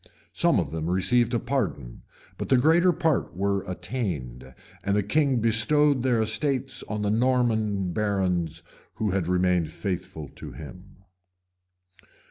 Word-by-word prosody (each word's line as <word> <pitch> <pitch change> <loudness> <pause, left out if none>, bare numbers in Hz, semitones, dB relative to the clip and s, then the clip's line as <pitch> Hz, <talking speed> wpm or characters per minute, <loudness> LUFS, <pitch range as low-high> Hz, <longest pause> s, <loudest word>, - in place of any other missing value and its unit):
Some - - +2
of - - -3
them 80 +1 -3
received 115 +6 +2
a - - +1
pardon; 100 - -3 0.4
but - - -4
the 130 - +5
greater 165 +7 +4
part 160 - -1
were 100 0 0
attainted; 90 - -5 0.3
and 100 0 0
the 105 - +1
king 135 +3 +1
bestowed 130 +5 +4
their 125 -2 +1
estates 130 +4 -1
on 105 0 -3
the 105 - 0
Norman 110 -6 +1
barons 90 -6 -1 0.3
who 105 -2 -1
had 95 -3 -1
remained 90 -2 +1
faithful 80 -4 -5
to - - -9
him. 90 +5 -12
105 Hz, 135 wpm, -25 LUFS, 90-125 Hz, 0.4 s, the